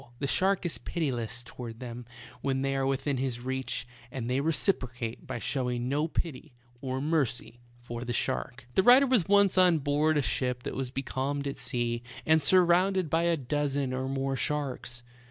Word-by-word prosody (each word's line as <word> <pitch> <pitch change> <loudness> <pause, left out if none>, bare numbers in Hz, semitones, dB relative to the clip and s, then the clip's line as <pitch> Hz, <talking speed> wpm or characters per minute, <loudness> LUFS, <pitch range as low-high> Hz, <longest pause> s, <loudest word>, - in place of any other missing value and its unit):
The 140 - -3
shark 190 +7 +2
is 170 - -2
pitiless 120 -8 -2
toward 120 -1 -8
them 120 -1 -7 0.3
when 135 -1 0
they 135 0 0
are 135 0 +1
within 135 +1 0
his 125 -2 -1
reach, 130 -1 -2 0.3
and 125 -3 -4
they 125 +2 +1
recipro 155 - +1
cate 115 -2 -5
by - - -3
showing 125 -1 -1
no 150 +3 +1
pity 155 -4 -4 0.3
or 130 -1 -2
mercy 135 -5 -1 0.2
for 120 -1 -7
the 120 - -3
shark. 120 +1 -2
The - - +4
writer 250 +6 +7
was 245 -10 +2
once 200 -2 +4
on 180 -3 +6
board 150 +2 +2
a 145 - +2
ship 125 -1 -1
that - - -4
was 135 -2 -3
becalmed 135 +2 -2
at 140 -1 -4
sea, 120 -2 -2 0.2
and 160 0 +4
surrounded 180 +2 +4
by 165 +1 +2
a 170 -1 +2
dozen 140 -1 -1
or 130 +1 -2
more 135 0 -1
sharks. 130 -4 -2
135 Hz, 180 wpm, -29 LUFS, 125-155 Hz, 0.3 s, writer